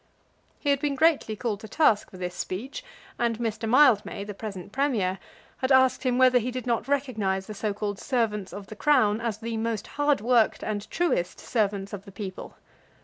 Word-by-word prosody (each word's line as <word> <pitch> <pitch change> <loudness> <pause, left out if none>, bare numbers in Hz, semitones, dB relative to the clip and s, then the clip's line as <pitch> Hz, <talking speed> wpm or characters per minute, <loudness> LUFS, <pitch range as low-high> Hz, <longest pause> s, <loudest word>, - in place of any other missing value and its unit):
He 285 - 0
had 280 - +2
been 285 -1 -1
greatly 305 -7 +2
called 215 -2 -2
to 220 - -9
task 220 -6 +3
for 185 - -12
this 180 -1 -4
speech; 210 +10 -5 0.4
and 235 -2 +1
Mr. 225 -1 -2
Mildmay, 245 -6 +4
the 205 0 -6
present 200 -3 -7
Premier, 220 -9 0 0.4
had 260 +1 -1
asked 260 -1 +5
him 250 -2 +1
whether 255 -1 +6
he 240 +2 -3
did 255 -1 -5
not 235 0 0
recognise 220 -9 0
the 215 - -7
so 210 +1 -2
called 205 -1 -4
servants 215 -7 -1
of 200 -1 -8
the 215 - -10
Crown 225 -5 +3
as 230 -3 -2
the 225 0 -4
most 220 -2 -2 0.2
hard 290 -1 +3
worked 235 +1 +2
and 210 -1 -3
truest 335 - 0
servants 200 -3 -1
of 200 0 -7
the 200 - -11
people. 190 -1 -7
220 Hz, 195 wpm, -26 LUFS, 205-255 Hz, 0.4 s, whether